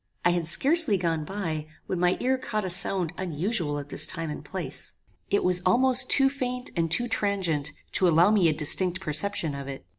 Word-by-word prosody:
I 175 Hz, -, +4 dB
had 175 Hz, -2 st, -2 dB
scarcely 280 Hz, -, +5 dB
gone 165 Hz, -3 st, -3 dB
by, 160 Hz, -5 st, -5 dB, 0.2 s
when 185 Hz, -, -4 dB
my 180 Hz, +1 st, +1 dB
ear 260 Hz, +1 st, -1 dB
caught 215 Hz, -5 st, -4 dB
a 185 Hz, -, -3 dB
sound 180 Hz, -1 st, 0 dB
unusual 170 Hz, -2 st, -3 dB
at 145 Hz, 0 st, -8 dB
this 155 Hz, -, +4 dB
time 165 Hz, -3 st, -5 dB
and -, -, -8 dB
place. -, -, -5 dB, 0.3 s
It 200 Hz, -, 0 dB
was 180 Hz, -1 st, +4 dB
almost 255 Hz, +6 st, +1 dB
too 270 Hz, -1 st, +5 dB
faint 250 Hz, -2 st, -4 dB
and 165 Hz, -2 st, -1 dB
too 240 Hz, +9 st, 0 dB
transient 195 Hz, -10 st, -1 dB, 0.2 s
to 185 Hz, -, +1 dB
allow 170 Hz, +4 st, +3 dB
me 195 Hz, -6 st, +3 dB
a -, -, 0 dB
distinct 180 Hz, +5 st, +3 dB
perception 160 Hz, -1 st, 0 dB
of 140 Hz, -1 st, -8 dB
it. 135 Hz, -1 st, -9 dB
180 Hz, 200 wpm, -25 LUFS, 160-210 Hz, 0.3 s, scarcely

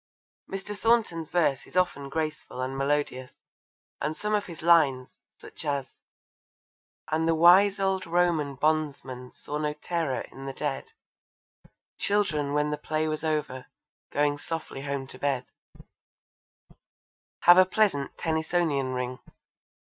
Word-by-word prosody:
Mr. 195 Hz, +2 st, -5 dB
Thornton's 210 Hz, -8 st, +1 dB
verse 155 Hz, -7 st, +1 dB
is -, -, -6 dB
often 160 Hz, -6 st, +1 dB
graceful 155 Hz, -3 st, -4 dB
and 130 Hz, +1 st, -2 dB
melodious, 135 Hz, -2 st, -1 dB, 0.7 s
and 155 Hz, +1 st, -2 dB
some 210 Hz, 0 st, -2 dB
of 205 Hz, -1 st, +1 dB
his 165 Hz, -3 st, -9 dB
lines, 145 Hz, -7 st, +4 dB, 0.3 s
such -, -, -10 dB
as 140 Hz, -2 st, -2 dB, 1.2 s
And 160 Hz, +1 st, +1 dB
the 165 Hz, -, +3 dB
wise 185 Hz, +5 st, +6 dB
old 190 Hz, -1 st, 0 dB
Roman 165 Hz, -5 st, +1 dB
bondsman 140 Hz, -4 st, -1 dB
saw 150 Hz, +3 st, -6 dB
no 150 Hz, -1 st, -1 dB
terror 155 Hz, -3 st, -2 dB
in 135 Hz, 0 st, -9 dB
the 135 Hz, -, -4 dB
dead 145 Hz, -, -4 dB, 1.1 s
Children 155 Hz, -9 st, +1 dB
when 150 Hz, 0 st, +1 dB
the 150 Hz, -, -1 dB
play 155 Hz, +1 st, -1 dB
was 155 Hz, 0 st, -3 dB
over, 150 Hz, -5 st, -2 dB, 0.4 s
going 145 Hz, 0 st, +1 dB
softly 160 Hz, -2 st, -5 dB
home 140 Hz, -1 st, -3 dB
to -, -, -11 dB
bed, 135 Hz, -3 st, 0 dB, 2.0 s
have 175 Hz, +1 st, +8 dB
a -, -, +9 dB
pleasant 185 Hz, -9 st, +1 dB
Tennysonian 160 Hz, -5 st, 0 dB
ring. 125 Hz, 0 st, -3 dB
155 Hz, 130 wpm, -27 LUFS, 140-175 Hz, 2.0 s, a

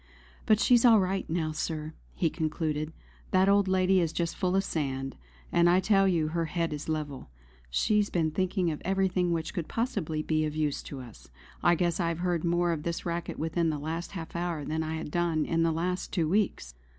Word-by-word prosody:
"But 215 Hz, -1 st, +5 dB
she's 240 Hz, 0 st, +5 dB
all 230 Hz, -3 st, +7 dB
right 190 Hz, 0 st, -1 dB
now, 160 Hz, -1 st, -1 dB
Sir," 155 Hz, 0 st, -3 dB, 0.2 s
he 165 Hz, -3 st, +1 dB
concluded. 155 Hz, -1 st, -2 dB, 0.4 s
"That 190 Hz, +1 st, +3 dB
old 200 Hz, 0 st, +4 dB
lady 190 Hz, 0 st, +3 dB
is 165 Hz, -3 st, +1 dB
just 170 Hz, 0 st, -2 dB
full 185 Hz, 0 st, 0 dB
of 195 Hz, -, +3 dB
sand; 135 Hz, -6 st, -3 dB, 0.4 s
and 170 Hz, 0 st, +4 dB
I 180 Hz, +1 st, +5 dB
tell 195 Hz, 0 st, +3 dB
you 165 Hz, -4 st, +1 dB
her 165 Hz, +1 st, -1 dB
head 165 Hz, 0 st, -1 dB
is 150 Hz, +1 st, -6 dB
level. 150 Hz, -, -4 dB, 0.4 s
She's 210 Hz, -, +2 dB
been 160 Hz, -3 st, 0 dB
thinking 180 Hz, 0 st, 0 dB
of 150 Hz, -, -6 dB
everything 190 Hz, -2 st, +1 dB
which 165 Hz, -1 st, -2 dB
could 170 Hz, -3 st, -3 dB
possibly 180 Hz, -10 st, -2 dB
be 155 Hz, 0 st, +1 dB
of 155 Hz, -1 st, -2 dB
use 150 Hz, -2 st, 0 dB
to 135 Hz, -2 st, -8 dB
us. 120 Hz, -3 st, -13 dB, 0.3 s
I 175 Hz, -, +4 dB
guess 170 Hz, +1 st, 0 dB
I 170 Hz, -, +1 dB
have 165 Hz, -1 st, -1 dB
heard 175 Hz, -2 st, -1 dB
more 175 Hz, 0 st, +2 dB
of 160 Hz, -3 st, -2 dB
this 170 Hz, +2 st, -3 dB
racket 170 Hz, 0 st, -3 dB
within 165 Hz, +1 st, 0 dB
the 155 Hz, -, -1 dB
last 160 Hz, +5 st, -4 dB
half 170 Hz, -4 st, -7 dB
hour 170 Hz, -4 st, -2 dB
than 160 Hz, +2 st, -1 dB
I 160 Hz, 0 st, -2 dB
have 160 Hz, -2 st, -5 dB
done 170 Hz, -2 st, +1 dB
in 165 Hz, 0 st, 0 dB
the 165 Hz, 0 st, +3 dB
last 180 Hz, +3 st, -2 dB
two 170 Hz, -5 st, +1 dB
weeks." 200 Hz, +4 st, 0 dB
170 Hz, 210 wpm, -29 LUFS, 155-185 Hz, 0.4 s, all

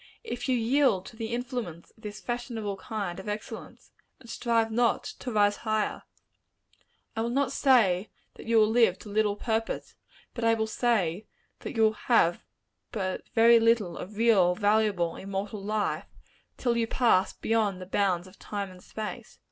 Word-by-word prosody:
If 280 Hz, -, -4 dB
you 255 Hz, -, +3 dB
yield 235 Hz, -5 st, +2 dB
to -, -, -11 dB
the 225 Hz, 0 st, -4 dB
influence 240 Hz, -, -4 dB
of -, -, -25 dB
this 210 Hz, -1 st, -7 dB
fashionable 235 Hz, -4 st, -4 dB
kind 195 Hz, -4 st, -4 dB
of 190 Hz, -, -6 dB
excellence, 210 Hz, +1 st, -7 dB, 0.3 s
and 245 Hz, -, -16 dB
strive 230 Hz, -1 st, 0 dB
not 235 Hz, +1 st, +2 dB, 0.2 s
to 250 Hz, -, -5 dB
rise 205 Hz, -1 st, +3 dB
higher, 215 Hz, -1 st, -1 dB, 1.1 s
I 225 Hz, -, -1 dB
will 230 Hz, -, -1 dB
not 270 Hz, +2 st, +1 dB
say 220 Hz, -9 st, +3 dB, 0.2 s
that -, -, -12 dB
you 230 Hz, 0 st, +3 dB
will 215 Hz, -1 st, +6 dB
live 225 Hz, -6 st, +4 dB
to 210 Hz, -, -11 dB
little 210 Hz, 0 st, +1 dB
purpose; 225 Hz, +1 st, -2 dB, 0.4 s
but 235 Hz, -, -5 dB
I 230 Hz, 0 st, +4 dB
will 220 Hz, -1 st, 0 dB
say, 215 Hz, -5 st, 0 dB, 0.3 s
that -, -, -7 dB
you 225 Hz, -, +3 dB
will 220 Hz, 0 st, +4 dB
have 210 Hz, -6 st, +2 dB, 0.5 s
but 190 Hz, -4 st, -3 dB
very 230 Hz, +1 st, +7 dB
little 225 Hz, -6 st, +2 dB
of 205 Hz, +3 st, -8 dB
real, 200 Hz, -6 st, +4 dB
valuable, 205 Hz, -5 st, +1 dB
immortal 195 Hz, +1 st, -5 dB
life, 210 Hz, 0 st, -1 dB, 0.5 s
till 240 Hz, -2 st, 0 dB
you 230 Hz, -1 st, +1 dB
pass 225 Hz, -7 st, +3 dB
beyond 215 Hz, -4 st, 0 dB
the 185 Hz, -, -7 dB
bounds 185 Hz, -2 st, 0 dB
of 185 Hz, +1 st, -16 dB
time 200 Hz, -2 st, -5 dB
and 180 Hz, 0 st, -15 dB
space. 215 Hz, -1 st, -7 dB
220 Hz, 170 wpm, -28 LUFS, 195-235 Hz, 1.1 s, very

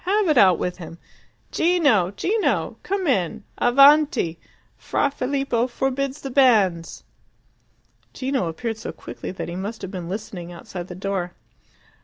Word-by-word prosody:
Have 400 Hz, 0 st, +2 dB
it 300 Hz, -, +3 dB
out 185 Hz, -5 st, +6 dB
with 180 Hz, 0 st, -3 dB
him. 165 Hz, -1 st, -9 dB, 0.5 s
Gino! 285 Hz, -, +3 dB
Gino! 390 Hz, -, -1 dB
Come 390 Hz, -1 st, -2 dB
in! 220 Hz, -, 0 dB, 0.2 s
Avanti! 275 Hz, -, +4 dB, 0.4 s
Fra 280 Hz, -, -1 dB
Filippo 260 Hz, -3 st, -1 dB
forbids 270 Hz, +2 st, -2 dB
the 270 Hz, -, -6 dB
banns!" 210 Hz, -11 st, +2 dB, 1.1 s
Gino 260 Hz, -7 st, -2 dB
appeared 220 Hz, +7 st, -4 dB
so -, -, -5 dB
quickly -, -, -8 dB
that 185 Hz, -, -5 dB
he 170 Hz, -, -6 dB
must 205 Hz, +5 st, -5 dB
have 190 Hz, -, -5 dB
been 180 Hz, -4 st, -6 dB
listening 185 Hz, -3 st, -6 dB
outside 175 Hz, +1 st, -8 dB
the 180 Hz, -, -8 dB
door. 185 Hz, -2 st, -3 dB
225 Hz, 140 wpm, -23 LUFS, 180-275 Hz, 1.1 s, out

